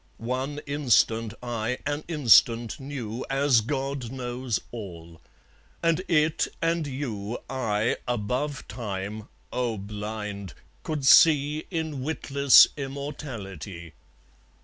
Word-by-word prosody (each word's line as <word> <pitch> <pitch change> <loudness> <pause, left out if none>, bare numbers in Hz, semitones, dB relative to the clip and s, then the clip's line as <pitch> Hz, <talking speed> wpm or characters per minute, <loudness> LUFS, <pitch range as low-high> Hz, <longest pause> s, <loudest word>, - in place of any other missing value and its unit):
One 130 +5 -3
instant 115 -5 +2
I, 120 0 -2
an 145 +1 -2
instant, 120 -7 +4
knew 130 -4 -5
As 135 -3 +3
God 135 0 -3
knows 125 -2 -3
all. 85 -7 -9 0.6
And 165 +1 +2
it 155 -1 +2
and 165 -2 0
you 120 -6 -4
I, 115 -4 0
above 125 +5 -2
Time, 105 -1 -5 0.3
oh, 120 -3 -1
blind! 105 -1 -6 0.3
could 150 -4 -3
see 150 +1 +6
In 160 -6 -3
witless 140 -1 +5
immortality. 115 - -7
125 Hz, 100 wpm, -26 LUFS, 110-145 Hz, 0.6 s, see